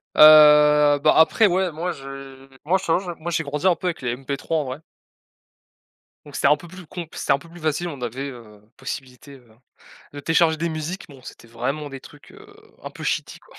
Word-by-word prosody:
Heu, 150 -1 +7
bah, 155 - +5
après 185 +7 +5
ouais 185 -1 0
moi 170 +4 -4
je 135 -2 -11 0.2
moi 185 +4 +2
je - - -8
t'avoue 165 +2 +2
je 180 -2 -6
moi 170 +2 -5
j'ai 165 - -1
grandi 150 +5 -2
un 180 - +4
peu 180 - -5
avec 170 - -3
les 120 -1 -2
MP3, 135 +4 -6
en 150 - 0
vrai. 130 +3 -6 1.5
Donc 145 - -12
c'était - - +2
un 150 +1 +4
peu 175 - -13
plus 185 0 -12
comp 170 0 -8
puis - - -10
c'était - - -1
un 140 - +4
peu 165 - -16
plus 175 -1 -14
facile, 155 +3 -1
on 140 -6 -8
avait, 130 +4 -5
heu, 110 -5 -14
possibilité, 135 0 -8
heu, 125 -2 -19 0.7
de 145 - -7
télécharger 165 0 +2
des 170 +1 -2
musiques, 160 +4 -6
bon, 135 -2 -15
c'était 120 - -13
vraiment 135 +6 -4
des 135 -1 -9
trucs, 145 +2 -17
heu, 425 0 -16 0.4
un - - -6
peu - - -11
shitty - - -3
quoi. - - -21
150 Hz, 225 wpm, -22 LUFS, 135-170 Hz, 1.5 s, Heu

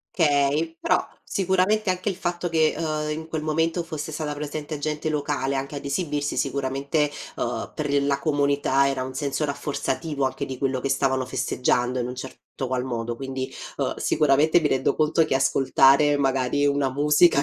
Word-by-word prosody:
Okay, 150 +1 +2
però, 180 0 +1 0.2
sicuramente, 190 +2 +1
anche 185 +2 0
il 190 - -3
fatto 175 -1 -2
che, 160 -1 +3
uhm, 155 -2 -2
in 160 +1 -5
quel 160 -1 -3
momento 165 +2 0
fosse 155 -1 -5
stata 150 -1 -3
presente 150 0 -5
gente 150 +1 -2
locale, 145 -2 -1
anche 135 +2 -3
ad 140 - -6
esibirsi, 145 -1 -2
sicuramente, 140 +2 0 0.2
uhm, - - -3
per 150 -1 -2
gl 140 0 +2
la 140 -1 +1
comunità, 140 -2 +2
era 135 -2 -1
un 130 0 -6
senso 140 +2 -2
rafforzativo, 145 0 -2
anche 130 - -2
di 130 - -6
quello 130 -1 0
che 135 - -2
stavano 130 -1 +1
festeggiando, 125 0 0
in 120 - -1
un 125 - -6
certo 130 +1 -8 0.3
qual 130 0 -1
modo, 120 -1 -3
quindi, 135 -1 -5 0.2
uhm, - - -1
sicuramente, 150 +3 +3
mi 150 - +1
rendo 135 0 +1
conto 155 +1 +3
che 135 - 0
ascoltare, 135 +2 +4
magari, 135 +1 +1
una 140 -1 +2
musica 150 +2 +4
145 Hz, 175 wpm, -24 LUFS, 135-155 Hz, 0.3 s, ascoltare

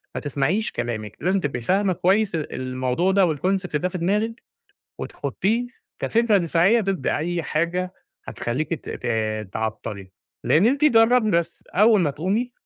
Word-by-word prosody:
ما - - -3
تسمَعيش 145 +9 -1
كلامِك، 110 -3 -4
لازم 185 +5 +2
تبقي 135 -7 -3
فاهمة 190 - +1
كويس 190 +2 +2
ال 155 - -4
الموضوع 130 +7 -1
ده 185 -6 +3
والconcept 185 +2 -1
ده 180 +4 -1
في 185 - -5
دماغِك، 210 +7 -1 0.6
وتحطّيه 230 +5 -2 0.3
كفكرة 230 -3 +2
دفاعية 175 +6 +3
ضد 195 -2 -2
أي 170 +2 -1
حاجة 175 +4 -1 0.3
هتخلّيكي 150 +7 -3
ت - - -11
ت - - -5 0.5
تعطّلي 105 -3 -4 0.3
لإن 165 +6 +4
أنتِ 280 +4 +2
جربي 225 -3 +4
بس 170 0 -1
أول 210 0 +4
ما 150 -5 +1
تقومي 200 - -1
180 Hz, 145 wpm, -23 LUFS, 150-210 Hz, 0.6 s, لإن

